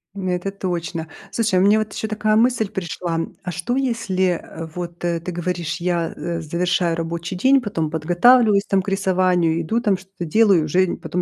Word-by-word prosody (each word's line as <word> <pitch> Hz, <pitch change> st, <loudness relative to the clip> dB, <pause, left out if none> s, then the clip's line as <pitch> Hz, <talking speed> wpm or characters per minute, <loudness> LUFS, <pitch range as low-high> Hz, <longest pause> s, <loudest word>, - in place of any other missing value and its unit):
М, 190 Hz, -2 st, -3 dB
это 180 Hz, +2 st, -2 dB
точно. 175 Hz, -4 st, -4 dB, 0.2 s
Слушай, 215 Hz, -5 st, +1 dB
а -, -, +3 dB
мне 205 Hz, +2 st, +5 dB
вот 215 Hz, -1 st, -3 dB
еще 220 Hz, -, -3 dB
такая 215 Hz, 0 st, +1 dB
мысль 230 Hz, -2 st, +2 dB
пришла, 170 Hz, -2 st, -3 dB, 0.2 s
а 180 Hz, -, -4 dB
что 180 Hz, +8 st, -2 dB
если, 190 Hz, -9 st, 0 dB
э, 165 Hz, +1 st, -8 dB
вот, 175 Hz, -1 st, -6 dB
э, 170 Hz, -1 st, 0 dB
ты 180 Hz, +2 st, -6 dB
говоришь 175 Hz, -2 st, -3 dB
я, 175 Hz, -2 st, -1 dB
э, 170 Hz, -1 st, -4 dB
завершаю 170 Hz, +1 st, 0 dB
рабочий 165 Hz, +2 st, -4 dB
день, 265 Hz, +7 st, +4 dB
потом 165 Hz, -8 st, -2 dB
подготавливаюсь 200 Hz, +6 st, +4 dB
там 195 Hz, -1 st, +2 dB
к 190 Hz, -, -5 dB
рисованию, 185 Hz, -4 st, +2 dB
иду 220 Hz, +8 st, 0 dB
там 205 Hz, -5 st, +2 dB
что-то 190 Hz, -1 st, -8 dB
делаю, 195 Hz, 0 st, +4 dB
и -, -, -1 dB
уже 180 Hz, +5 st, +2 dB
н -, -, -3 dB
потом 180 Hz, -, -3 dB
180 Hz, 200 wpm, -21 LUFS, 170-205 Hz, 0.2 s, мне